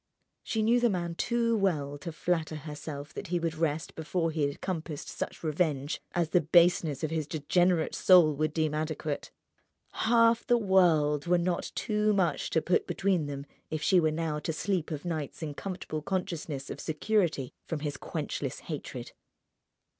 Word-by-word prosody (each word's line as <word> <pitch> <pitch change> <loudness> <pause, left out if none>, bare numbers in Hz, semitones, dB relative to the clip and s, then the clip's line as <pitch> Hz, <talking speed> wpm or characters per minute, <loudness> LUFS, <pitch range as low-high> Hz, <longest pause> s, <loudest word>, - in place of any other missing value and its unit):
She 220 -1 -1
knew 235 +3 +4
the 240 -1 +3
man 175 -4 -2
too 235 +5 +1
well 155 -9 0
to 165 +4 -5
flatter 160 0 -1
herself 150 -1 -7
that - - -6
he 175 +1 0
would 165 -1 -1
rest 160 0 -1
before 165 +1 -1
he 155 -1 -2
had 140 - -6
compassed 160 -5 -4
such - - -5
revenge 150 -3 0
as 170 -2 +1
the 180 - +4
baseness 160 -3 +4
of 155 - -1
his 155 -3 -1
degenerate 170 +3 +2
soul 175 -5 +6
would 155 +1 0
deem 155 -1 0
adequate. 155 -1 -3 0.6
Half 230 0 +3
the 240 -2 +5
world 170 -8 +3
were 180 +1 +4
not 175 0 -1
too 210 0 +1
much 185 -4 +1
to 160 - +1
put 180 - +1
between 190 -6 +1
them 140 -1 -5 0.2
if 155 0 -3
she 185 +1 +5
were 160 -2 +3
now 155 -1 -2
to 155 - -2
sleep 175 +1 -1
of 155 0 -5
nights 160 -2 -4
in 150 -2 -3
comfortable 180 -2 -5
consciousness 160 -5 -3
of - - -6
security 160 - 0
from 160 -3 -3
his 145 -1 -2
quenchless - - -4
hatred. - - -6
165 Hz, 170 wpm, -29 LUFS, 150-185 Hz, 0.6 s, soul